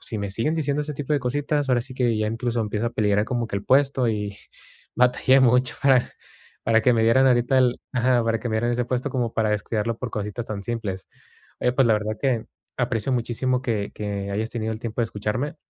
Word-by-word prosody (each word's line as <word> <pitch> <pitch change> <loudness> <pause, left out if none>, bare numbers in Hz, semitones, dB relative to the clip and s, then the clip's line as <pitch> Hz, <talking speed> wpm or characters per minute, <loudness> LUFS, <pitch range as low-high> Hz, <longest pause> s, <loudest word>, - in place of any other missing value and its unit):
si 110 - -5
me 100 -1 -3
siguen 115 +11 -1
diciendo 145 -2 0
ese 150 0 -5
tipo 145 +1 -3
de 145 - +2
cositas, 145 +3 -1
ahora 125 -2 +3
sí 130 +1 -9
que 120 -3 +1
ya 110 - 0
incluso 115 +1 -2
empiezo 105 +1 -2
a - - -1
peligrar 105 -2 +2
como 120 -1 -2
que - - -7
el 100 - -5
puesto, 135 -1 +3
y 105 -2 -3 0.6
batallé 125 +2 +4
mucho 125 0 +3
para 130 -3 +4 0.6
para 115 0 +4
que 125 - +4
me 115 -1 +2
dieran 115 +4 +4
ahorita 125 +1 +3
el 125 -1 +2
ajá, 125 -1 +2
para 115 0 +1
que 120 - -4
me 110 - -2
dieran 120 +2 0
ese 120 0 0
puesto, 130 +3 -2
como 120 -3 -1
para 110 -1 +1
descuidarlo 110 +2 -1
por 125 -3 -4
cositas 105 +2 -4
tan 100 -2 -5
simples. 105 -5 -4 0.5
Oye, 125 - +2
pues, 130 -1 +3
la - - +5
verdad 105 0 -1
que, 125 -5 0 0.3
aprecio 125 0 -1
muchísimo 125 +1 0
que 105 -5 -2
que 100 -1 -4
hayas 110 +3 -2
tenido 110 -1 -3
el 110 - -5
tiempo 115 0 -4
de - - +3
escucharme, 115 +9 -3
120 Hz, 225 wpm, -24 LUFS, 110-130 Hz, 0.6 s, la